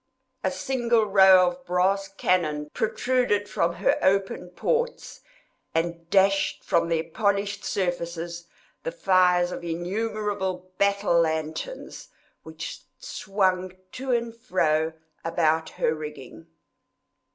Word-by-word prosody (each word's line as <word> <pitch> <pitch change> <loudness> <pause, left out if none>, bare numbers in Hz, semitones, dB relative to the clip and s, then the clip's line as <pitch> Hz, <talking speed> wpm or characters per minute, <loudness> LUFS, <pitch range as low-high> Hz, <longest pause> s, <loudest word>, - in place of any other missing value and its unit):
A 190 - +2
single 235 +3 +1
row 190 -2 +7
of 265 +9 -11
brass 195 -2 +1
cannon 155 -6 0
protruded 225 -2 +1
from 170 -3 0
her - - +1
open 190 -2 +1
ports, 475 - -2 0.5
and 170 0 -2
dashed 195 +1 +3
from 170 0 +1
their 165 -1 +1
polished 200 +3 -1
surfaces 170 -2 -3 0.3
the - - -3
fires 180 - +3
of - - -6
innumerable 190 +1 -3
battle 200 -3 +3
lanterns, 160 - -3 0.3
which - - -7 0.2
swung 185 -2 -1 0.2
to 260 0 -4
and 235 -1 0
fro 160 -9 0 0.3
about 160 -1 +1
her - - 0
rigging. 150 0 -9
185 Hz, 105 wpm, -25 LUFS, 170-205 Hz, 0.5 s, row